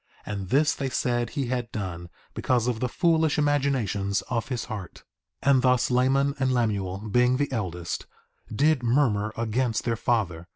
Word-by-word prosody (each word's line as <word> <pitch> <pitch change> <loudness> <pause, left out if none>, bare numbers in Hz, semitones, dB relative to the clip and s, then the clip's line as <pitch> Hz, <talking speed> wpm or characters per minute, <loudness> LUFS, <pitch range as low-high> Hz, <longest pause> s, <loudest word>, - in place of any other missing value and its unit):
And 100 -3 -5
this 150 +5 +3
they 135 -1 -3
said 120 -2 0
he 140 -3 -2
had 125 -1 -3
done 85 -4 -5 0.2
because 125 -3 +1
of 120 -3 -1
the 125 - -1
foolish 160 -2 +2
imaginations 130 -10 0
of 115 -2 -1
his 125 -4 -3
heart. 105 -6 -8 0.4
2:12 140 - +4
And 130 -2 +4
thus 125 -1 +2
Laman 135 +3 +2
and 130 -1 +1
Lemuel, 105 -4 -1
being 125 +3 +3
the 145 0 -1
eldest, 90 -7 -4 0.4
did 145 +4 +2
murmur 115 -4 +1
against 115 0 0
their 115 -1 0
father. 90 -8 -1
120 Hz, 165 wpm, -26 LUFS, 105-135 Hz, 0.4 s, 2:12